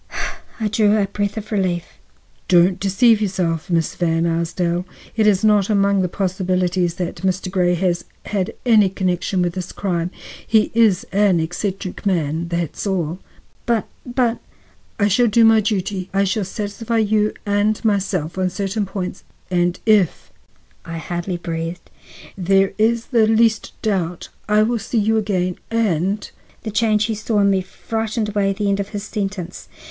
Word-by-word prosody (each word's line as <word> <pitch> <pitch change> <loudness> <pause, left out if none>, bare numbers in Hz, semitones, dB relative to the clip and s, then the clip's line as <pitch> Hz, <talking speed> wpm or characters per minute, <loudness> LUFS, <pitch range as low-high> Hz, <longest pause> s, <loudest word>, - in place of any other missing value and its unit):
I 220 - 0
drew 215 0 +3
a 205 - +2
breath 205 +1 -3
of 215 0 -6
relief. 185 -4 -2 0.5
"Don't 180 +1 +4
deceive 210 +3 +3
yourself, 180 -5 -1
Miss 165 -3 +1
Van 165 -1 0
Arsdale; 170 +1 0 0.3
it 220 -2 +3
is 200 -2 +3
not 210 -2 +4
among 200 -1 +3
the 180 - 0
possibilities 180 -2 0
that 180 -2 -4
Mr. 185 0 -1
Grey 180 -2 +2
has 175 -1 0 0.2
had 195 -3 -2
any 215 -5 +5
connection 185 0 -1
with 175 -1 -1
this 185 -1 -5
crime. 175 -3 -2 0.4
He 220 -1 +3
is 220 -5 +3
an 195 -3 +3
eccentric 185 +3 -3
man, 170 -4 0
that's 170 +3 -3
all." 180 -3 -1 0.5
"But—but—" 240 +1 -1 0.6
"I 205 - +4
shall 235 +5 +3
do 230 +1 +5
my 225 0 +6
duty. 195 -3 -2
I 195 - +4
shall 200 +1 0
satisfy 210 +4 -3
you 215 -1 +2
and 210 +2 +1
myself 190 -5 0
on 185 0 +1
certain 200 +2 -2
points, 185 -1 -5 0.3
and 175 0 +1
if—" 210 -6 +2 0.5
I 165 0 -6
hardly 175 +2 -3
breathed 165 0 -5 0.4
"—there 195 +1 +2
is 230 +1 +2
the 225 -3 +4
least 225 0 +2
doubt, 180 -5 -1 0.2
I 210 0 +5
will 235 +1 0
see 230 - -3
you 220 +1 +2
again 185 -4 -1
and—" 205 -3 0 0.4
The 220 - -4
change 215 0 +2
he 225 - -1
saw 215 0 0
in 200 0 +4
me 190 -1 +2
frightened 220 +3 -3
away 200 -1 +1
the 205 +1 -2
end 200 0 +1
of 200 0 -3
his 205 -2 -5
sentence. 195 -5 -5
195 Hz, 160 wpm, -20 LUFS, 180-215 Hz, 0.6 s, my